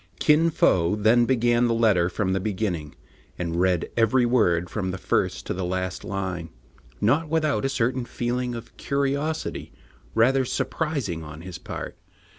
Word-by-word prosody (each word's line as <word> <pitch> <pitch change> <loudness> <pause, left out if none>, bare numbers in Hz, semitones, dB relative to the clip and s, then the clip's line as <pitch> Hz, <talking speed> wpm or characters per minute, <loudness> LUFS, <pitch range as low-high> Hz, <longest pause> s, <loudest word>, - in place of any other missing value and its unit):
Kin 160 +2 +4
Fo 90 - +3
then 110 +3 +4
began 120 -1 +3
the 115 - +1
letter 105 -7 +3
from 95 +1 -1
the 95 - +1
beginning, 95 -7 -3 0.4
and 85 -1 -3
read 90 -2 +1
every 120 +2 +3
word 90 -8 +2
from 95 +1 -3
the 95 - -3
first - - -1
to - - -2
the 95 - -3
last 95 +1 -3
line, 95 -3 -4 0.5
not 150 +8 +2
without 155 -3 +1
a - - +1
certain 130 -1 0
feeling 120 +1 -2
of 115 0 -9
curiosity 140 +3 -2 0.4
rather 130 +4 +4
surprising 130 - -2
on 75 0 -9
his 90 -2 -8
part. - - -7
115 Hz, 155 wpm, -25 LUFS, 90-130 Hz, 0.5 s, Kin